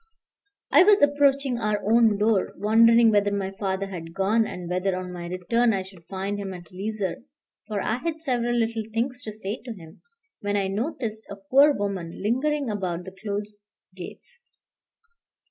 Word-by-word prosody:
I 295 +6 +8
was 410 -2 +5
approaching 280 -3 +3
our 210 -2 0
own 225 -1 +4
door, 210 -2 +1
wondering 230 +3 +5
whether 205 -1 +3
my 195 -1 -2
father 195 0 -2
had 170 -4 -8
gone, 215 +4 +2
and 180 -1 -7
whether, 180 +2 0
on 180 0 -6
my 175 -1 -6
return, 225 +7 +1
I 190 -1 -1
should 185 -3 -16
find 195 +1 -3
him 195 -2 -5
at 175 -2 -12
leisure, 195 0 -3 0.5
for 210 -2 -2
I 220 - 0
had 320 +4 -3
several 240 -5 0
little 225 -1 -1
things 250 +3 -2
to 220 - -6
say 210 0 -5
to 240 - -6
him, 165 -6 -14 0.4
when 205 0 -1
I 195 -1 0
noticed 220 0 -3
a 200 - -6
poor 260 +10 +4
woman 195 -8 -3
lingering 275 +6 0
about 185 -5 -3
the 190 - -9
closed 205 +1 -5 0.4
gates. 480 - -11
210 Hz, 170 wpm, -25 LUFS, 190-235 Hz, 0.5 s, I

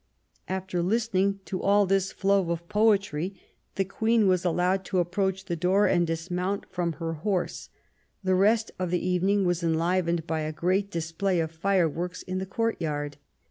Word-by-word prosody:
After 190 -1 -2
listening 200 0 +1
to 185 - -4
all 200 +1 +4
this 195 0 +1
flow 195 -3 +1
of 170 0 -3
poetry 200 -4 +1 0.4
the 195 - +1
Queen 220 +2 +2
was 185 -2 +2
allowed 180 +2 +1
to 190 - -2
approach 190 +2 0
the 175 - -2
door 185 +5 +3
and 175 -1 +2
dismount 180 +4 -2
from 175 -2 -1
her 165 +1 -4
horse. 190 -2 -2 0.5
The 185 0 +2
rest 215 +4 +3
of 185 -1 -1
the 180 +1 -1
evening 190 +2 +2
was 175 -1 +1
enlivened 170 0 +1
by 160 -1 -1
a 155 0 -2
great 185 +5 0
display 170 +2 -1
of 160 -1 -1
fireworks 175 0 0
in 185 0 -3
the 190 - -4
courtyard. 155 -10 -2
185 Hz, 165 wpm, -27 LUFS, 170-195 Hz, 0.5 s, all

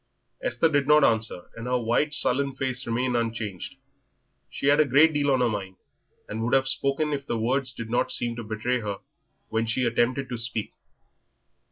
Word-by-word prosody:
Esther - - +1
did 145 -3 +1
not 150 0 +6
answer, 110 -7 +1
and 115 +1 -7
her 125 0 +1
white, 120 +6 +1
sullen 140 -1 +1
face 130 -1 -2
remained 125 +2 0
unchanged. 115 -5 -3 0.7
She - - -6
had 145 +1 +5
a 155 - +6
great 145 +4 +5
deal 145 -1 +1
on 130 -2 +2
her 125 - +3
mind, 100 -4 -4 0.5
and 110 +1 -5
would 120 +3 +2
have 135 0 +2
spoken 140 +3 +1
if 140 -1 -4
the 115 - -1
words 125 +3 0
did 115 -2 -8
not 120 - +1
seem 120 -1 -1
to 120 - -5
betray 110 +4 -2
her 105 -3 -4 0.5
when 110 +1 -1
she 125 +3 0
attempted 120 +3 0
to 120 -2 -4
speak. 115 -2 -3
125 Hz, 190 wpm, -26 LUFS, 115-140 Hz, 0.7 s, not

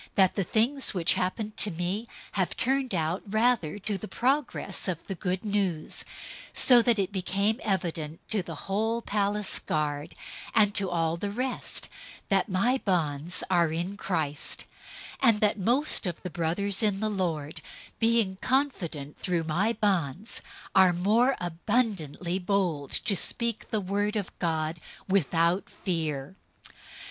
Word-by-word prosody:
"} - - -39
that 190 -2 +5
the 195 - 0
things 235 +7 +2
which 175 -2 +3
happened 210 +4 -2
to 210 - +4
me 180 +6 -2 0.2
have 190 -3 -1
turned 265 -4 +1
out 165 +2 0
rather 215 -5 +2
to 200 0 -2
the 215 - -6
progress 270 +1 0
of 170 -3 -3
the 195 - -4
Good 185 +1 -3
News; 195 -6 0 0.5
001:013 - - -8
so 245 -2 +7
that 235 -1 +3
it 195 0 0
became 200 +3 0
evident 165 -6 -2
to 215 -3 +2
the 170 -2 -7
whole 220 +4 0
praetorian 205 0 0 0.2
guard, 150 -1 -2 0.4
and 210 -2 +5
to 195 -2 +1
all 165 -1 0
the 200 +4 -3
rest, 250 +5 -3 0.4
that 195 -1 +2
my 235 +8 +2
bonds 165 -3 0
are 170 -3 +3
in 175 +5 -2
Christ; 160 -7 -2 0.6
001:014 260 - +6
and 215 -2 +3
that 210 0 +2
most 240 +2 +2
of 175 - -3
the 180 - -5
brothers 180 +6 0
in 205 -3 +2
the 215 - 0
Lord, 165 -7 -2 0.4
being 225 -4 +2
confident 180 - -1
through 175 -3 0
my 175 +8 +1
bonds, 195 - 0 0.3
are 190 -2 +6
more 220 +9 +3
abundantly 175 - -1
bold 180 -7 0
to 205 - +1
speak 230 +5 -1
the 220 - +1
word 205 +2 -1
of 205 -4 -2
God 160 -1 -1 0.3
without 175 -1 +2
fear. 155 -4 -3
195 Hz, 150 wpm, -28 LUFS, 170-215 Hz, 0.6 s, so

